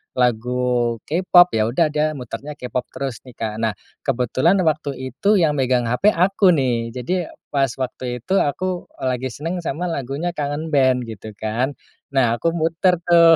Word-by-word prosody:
lagu 125 Hz, 0 st, +1 dB
K-Pop, 175 Hz, -2 st, +5 dB
ya 110 Hz, -, +3 dB
udah 155 Hz, +6 st, +2 dB
dia 150 Hz, +1 st, +1 dB
mutarnya 140 Hz, +3 st, -6 dB
K-Pop 125 Hz, 0 st, -2 dB
terus 135 Hz, -4 st, -5 dB
nih, 125 Hz, -, -11 dB
Kak. 110 Hz, -1 st, -3 dB
Nah, 110 Hz, -1 st, +2 dB, 0.3 s
kebetulan 135 Hz, -, +2 dB
waktu 155 Hz, -3 st, 0 dB, 0.2 s
itu 210 Hz, +1 st, +2 dB
yang 150 Hz, -3 st, +3 dB
megang 125 Hz, -3 st, +1 dB
HP 160 Hz, -, +3 dB
aku 190 Hz, +2 st, +4 dB
nih. 120 Hz, -4 st, 0 dB
Jadi 175 Hz, +9 st, -1 dB, 0.3 s
pas 135 Hz, -3 st, +1 dB
waktu 125 Hz, -1 st, -3 dB
itu 190 Hz, -, 0 dB
aku, 180 Hz, +5 st, -1 dB
eee, 130 Hz, -, 0 dB
lagi 130 Hz, +1 st, -2 dB
senang 165 Hz, +4 st, -3 dB
sama 170 Hz, +4 st, -2 dB
lagunya 140 Hz, +5 st, -3 dB
Kangen 145 Hz, +2 st, -2 dB
Band, 130 Hz, -2 st, +3 dB
gitu 110 Hz, 0 st, -8 dB
kan. 115 Hz, +6 st, -1 dB, 0.4 s
Nah, 120 Hz, -4 st, +3 dB
aku 165 Hz, -, +1 dB
muter 165 Hz, +2 st, +2 dB
tuh 170 Hz, -1 st, +7 dB
135 Hz, 165 wpm, -21 LUFS, 125-165 Hz, 0.4 s, tuh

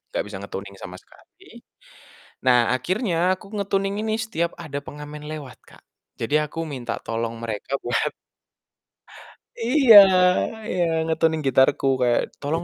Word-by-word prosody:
Gak -, -, 0 dB
bisa -, -, -7 dB
nge-tuning 100 Hz, 0 st, -8 dB
sama 90 Hz, 0 st, -8 dB
sekali. -, -, -19 dB, 0.8 s
Nah, 125 Hz, -1 st, +4 dB
akhirnya 180 Hz, -, 0 dB
aku -, -, -17 dB
nge-tuning 195 Hz, -1 st, -1 dB
ini 220 Hz, 0 st, -1 dB
setiap 170 Hz, -6 st, -2 dB
ada 150 Hz, -4 st, -5 dB
pengamen 150 Hz, 0 st, -9 dB
lewat, 145 Hz, -5 st, -8 dB
Kak. -, -, -19 dB, 0.4 s
Jadi 115 Hz, +6 st, -1 dB
aku 165 Hz, +2 st, -5 dB
minta 130 Hz, -5 st, -4 dB
tolong 115 Hz, 0 st, -3 dB
mereka 115 Hz, +4 st, -4 dB
buat 120 Hz, -, 0 dB, 1.6 s
Iya 250 Hz, -1 st, +6 dB, 0.7 s
iya, 180 Hz, -5 st, 0 dB, 0.2 s
nge-tuning 160 Hz, 0 st, +1 dB
gitarku 130 Hz, +1 st, +3 dB, 0.2 s
kayak, 120 Hz, -1 st, +3 dB, 0.2 s
"Tolong 160 Hz, +4 st, -2 dB
150 Hz, 130 wpm, -23 LUFS, 125-180 Hz, 1.6 s, Iya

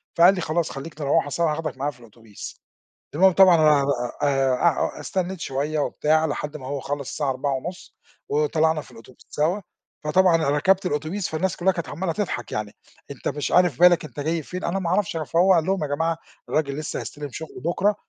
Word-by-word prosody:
فقال 180 Hz, +3 st, +6 dB
لي 180 Hz, -, -3 dB
"خلاص 165 Hz, +1 st, -1 dB
خلّيك 155 Hz, +3 st, -8 dB
نروَّح 145 Hz, +1 st, +2 dB
سوا، 165 Hz, +2 st, +1 dB
هاخدَك 155 Hz, -3 st, -4 dB
معايا 140 Hz, +2 st, -1 dB
في 125 Hz, -, -21 dB
الأوتوبيس" 115 Hz, -2 st, -11 dB, 0.6 s
المُهم 190 Hz, +4 st, +6 dB
طبعًا 185 Hz, -1 st, +7 dB
أنا 150 Hz, -3 st, +5 dB, 0.7 s
أع 165 Hz, +2 st, +1 dB
أ -, -, -8 dB
استنّيت 185 Hz, -1 st, -3 dB
شويّة 145 Hz, +1 st, -2 dB
وبتاع 155 Hz, +2 st, +1 dB
لحد 150 Hz, 0 st, -4 dB
ما 130 Hz, -3 st, -9 dB
هو 140 Hz, 0 st, -3 dB
خلَّص 140 Hz, 0 st, -4 dB
الساعة 145 Hz, -3 st, -2 dB
16:30، 135 Hz, +6 st, -4 dB, 0.3 s
وطلَعنا 155 Hz, +2 st, +1 dB
في -, -, -16 dB
الأوتوبيس 120 Hz, +2 st, -16 dB
سوا، 165 Hz, +7 st, 0 dB, 0.4 s
فطبعًا 180 Hz, +2 st, +4 dB
أنا 160 Hz, -3 st, +1 dB
ركَبت 185 Hz, +7 st, +2 dB
الأوتوبيس 160 Hz, +5 st, -2 dB
فالناس 170 Hz, +4 st, -1 dB
كلهّا 190 Hz, +2 st, +3 dB
كانت 170 Hz, -4 st, -5 dB
عمّالة 170 Hz, +1 st, -2 dB
تضحَك 175 Hz, -, -3 dB
يعني. 105 Hz, -1 st, -3 dB, 0.4 s
أنت -, -, -6 dB
مش 145 Hz, -, -2 dB
عارف 175 Hz, -7 st, +3 dB
بالَك، 175 Hz, -2 st, +6 dB
أنت 150 Hz, -, -10 dB
جاي 160 Hz, +3 st, -1 dB
فين، 180 Hz, +5 st, -6 dB
أنا 185 Hz, +3 st, -1 dB
ما 175 Hz, -3 st, -2 dB
أعرَفش، 185 Hz, -2 st, 0 dB
فهو 170 Hz, +5 st, +3 dB
قال 165 Hz, -3 st, +2 dB
لهم 190 Hz, -2 st, 0 dB
"يا -, -, -1 dB
جماعة 165 Hz, +2 st, 0 dB, 0.3 s
الراجل 145 Hz, -3 st, 0 dB
لسّه 155 Hz, -, -4 dB
هيستلم 145 Hz, -1 st, -7 dB
شُغله 160 Hz, +5 st, -8 dB
بُكرة 195 Hz, +5 st, +2 dB
155 Hz, 190 wpm, -24 LUFS, 145-175 Hz, 0.7 s, طبعًا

